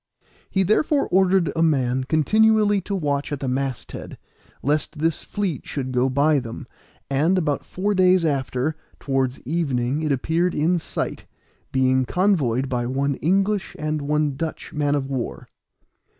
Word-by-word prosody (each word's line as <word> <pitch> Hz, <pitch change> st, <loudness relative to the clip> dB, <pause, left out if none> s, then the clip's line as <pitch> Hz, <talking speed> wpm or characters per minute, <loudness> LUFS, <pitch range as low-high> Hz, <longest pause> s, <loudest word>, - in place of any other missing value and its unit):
He 190 Hz, -, +1 dB
therefore 275 Hz, -, +2 dB
ordered 185 Hz, -3 st, +3 dB
a 165 Hz, -, +1 dB
man 130 Hz, -5 st, +2 dB
continually 210 Hz, +7 st, +3 dB
to 200 Hz, +2 st, -3 dB
watch 145 Hz, -5 st, -1 dB
at 145 Hz, -, -2 dB
the 135 Hz, -, -3 dB
mast 130 Hz, -1 st, -2 dB
head, -, -, -8 dB, 0.5 s
lest 150 Hz, +3 st, 0 dB
this 160 Hz, +1 st, 0 dB
fleet 190 Hz, -9 st, -3 dB
should 130 Hz, -3 st, -3 dB
go 125 Hz, +1 st, +2 dB
by 145 Hz, +3 st, +3 dB
them; 115 Hz, -3 st, -7 dB, 0.4 s
and 155 Hz, +7 st, +2 dB
about 150 Hz, -5 st, 0 dB
four 200 Hz, +3 st, -2 dB
days 185 Hz, -2 st, +4 dB
after, 140 Hz, 0 st, -1 dB, 0.2 s
towards 135 Hz, -2 st, -1 dB
evening 140 Hz, -2 st, -1 dB
it 155 Hz, -2 st, 0 dB
appeared 165 Hz, +6 st, 0 dB
in 170 Hz, +4 st, +2 dB
sight, -, -, -4 dB, 0.4 s
being 130 Hz, 0 st, +2 dB
convoyed 140 Hz, -, +1 dB
by 120 Hz, -2 st, -1 dB
one 140 Hz, +2 st, 0 dB
English 195 Hz, +4 st, 0 dB
and 155 Hz, 0 st, -2 dB
one 150 Hz, 0 st, 0 dB
Dutch 160 Hz, +3 st, -5 dB
man 145 Hz, -1 st, +1 dB
of 135 Hz, -2 st, -1 dB
war. 130 Hz, -3 st, -4 dB
150 Hz, 150 wpm, -23 LUFS, 135-180 Hz, 0.5 s, days